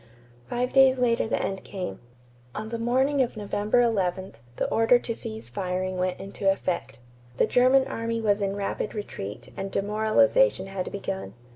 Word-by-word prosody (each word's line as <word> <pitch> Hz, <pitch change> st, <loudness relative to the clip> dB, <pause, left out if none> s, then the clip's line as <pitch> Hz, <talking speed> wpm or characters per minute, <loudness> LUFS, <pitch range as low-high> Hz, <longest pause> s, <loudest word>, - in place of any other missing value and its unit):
Five 250 Hz, +1 st, -1 dB
days 265 Hz, -1 st, +6 dB
later 235 Hz, -2 st, +2 dB
the -, -, 0 dB
end 195 Hz, -1 st, -3 dB
came. 180 Hz, -, -5 dB, 0.6 s
On 215 Hz, +1 st, -4 dB
the 230 Hz, 0 st, -4 dB
morning 265 Hz, +4 st, +2 dB
of 240 Hz, -3 st, -1 dB
November 210 Hz, +3 st, +1 dB
11, 190 Hz, -5 st, 0 dB, 0.2 s
the -, -, -1 dB
order 225 Hz, +2 st, +5 dB
to 240 Hz, -1 st, -4 dB
cease 110 Hz, -, -6 dB
firing 185 Hz, +7 st, -2 dB
went 185 Hz, 0 st, -1 dB
into 195 Hz, 0 st, 0 dB
effect. 180 Hz, -10 st, -3 dB, 0.4 s
The -, -, +4 dB
German 255 Hz, +2 st, +4 dB
army 230 Hz, 0 st, -2 dB
was 210 Hz, -2 st, +1 dB
in 195 Hz, 0 st, -1 dB
rapid 200 Hz, +1 st, -3 dB
retreat 105 Hz, -, -7 dB
and 195 Hz, 0 st, -5 dB
demoralization 220 Hz, -, +3 dB
had 195 Hz, -1 st, -4 dB
begun. 190 Hz, -, -5 dB
210 Hz, 160 wpm, -26 LUFS, 190-240 Hz, 0.6 s, days